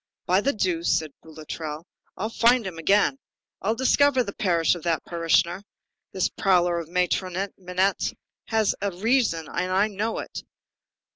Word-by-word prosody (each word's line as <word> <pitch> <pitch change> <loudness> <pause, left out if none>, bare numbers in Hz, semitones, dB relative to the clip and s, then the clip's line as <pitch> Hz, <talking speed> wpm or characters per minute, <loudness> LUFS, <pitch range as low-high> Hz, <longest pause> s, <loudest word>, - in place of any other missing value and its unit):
"By 185 +2 +3
the 275 - +2
deuce," 175 -7 0
said 155 -2 -4
Boulatruelle, 155 0 -7 0.3
"I'll 215 +4 -3
find 240 0 +3
him 175 -3 -6
again. 205 - +2 0.4
I'll 220 - 0
discover 265 +1 +3
the 200 -3 -6
parish 175 -7 +2
of 175 - -6
that 165 0 -1
parishioner. 170 +2 +1 0.5
This 190 - 0
prowler 175 -3 +2
of 165 0 -8
Patron 185 +2 0
Minette 185 +1 0 0.4
has 220 -2 +2
a 200 - 0
reason, 195 - +1
and 185 - -2
I'll 195 +3 +3
know 215 +2 -2
it. - - -6
185 Hz, 150 wpm, -25 LUFS, 170-215 Hz, 0.5 s, By